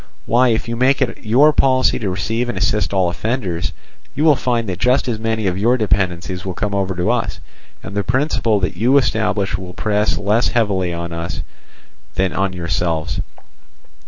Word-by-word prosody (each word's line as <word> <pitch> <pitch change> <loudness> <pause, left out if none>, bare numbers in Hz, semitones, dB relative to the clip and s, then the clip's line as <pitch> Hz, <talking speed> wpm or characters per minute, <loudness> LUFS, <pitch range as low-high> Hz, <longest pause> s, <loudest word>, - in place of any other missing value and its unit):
Why, 125 +2 +3
if 115 -1 0
you 115 - -2
make 130 +3 +3
it 130 - -2
your 135 +8 +5
policy 130 -2 +3
to 105 - -2
receive 110 +7 -2
and 105 - -3
assist 105 +2 +1
all 95 -2 +2
offenders, 95 -5 -2 0.4
you 145 - 0
will 155 -2 +6
find 120 -3 -1
that 90 -2 -4
just 125 +3 +2
as 115 -3 -2
many 110 -1 -1
of 95 0 0
your 120 +5 +3
dependencies 95 -3 -1
will 95 -2 -4
come 105 -2 -2
over 95 -2 -1
to 90 0 +1
us, - - -2 0.4
and 100 - -8
the 100 - 0
principle 125 -4 +1
that 90 - -1
you 125 +5 +3
establish 105 -6 0
will 90 -1 -8
press 105 0 0
less 105 +4 +2
heavily 100 -7 0
on 85 0 -5
us 85 0 -4 0.7
than 95 0 0
on 95 0 0
yourselves. 85 -2 -2
105 Hz, 185 wpm, -19 LUFS, 95-120 Hz, 0.7 s, will